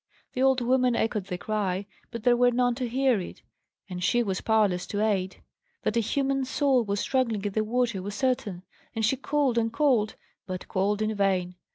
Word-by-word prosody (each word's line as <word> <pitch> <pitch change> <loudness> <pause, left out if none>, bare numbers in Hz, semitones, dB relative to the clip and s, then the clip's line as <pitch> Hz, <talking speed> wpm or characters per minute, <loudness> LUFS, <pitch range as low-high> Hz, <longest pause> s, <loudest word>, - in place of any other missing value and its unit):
The 255 - -2
old 265 -1 +4
woman 250 0 +2
echoed 210 -4 -1
the 180 - -3
cry; 200 -1 -2 0.2
but 230 -2 -7
there 245 0 +5
were 245 0 +4
none 245 0 +2
to 245 0 -3
hear 260 -2 +2
it, - - -9 0.4
and 180 -2 -5
she 240 +6 +3
was 190 -4 -2
powerless 210 -5 +2
to 205 - -3
aid. 195 -3 -1 0.4
That 215 - 0
a - - +4
human 270 +4 0
soul 260 -1 +2
was 200 -1 -2
struggling 230 -6 0
in 205 - -1
the 215 +2 0
water 230 -3 0
was 205 +2 -5
certain; 250 -9 -1 0.3
and 220 -1 +1
she 225 - +2
called 275 -2 +1
and 225 0 0
called, 240 -5 +2 0.3
but 185 -1 -5
called 205 +3 0
in 215 0 0
vain. 190 -3 0
225 Hz, 200 wpm, -27 LUFS, 200-250 Hz, 0.4 s, there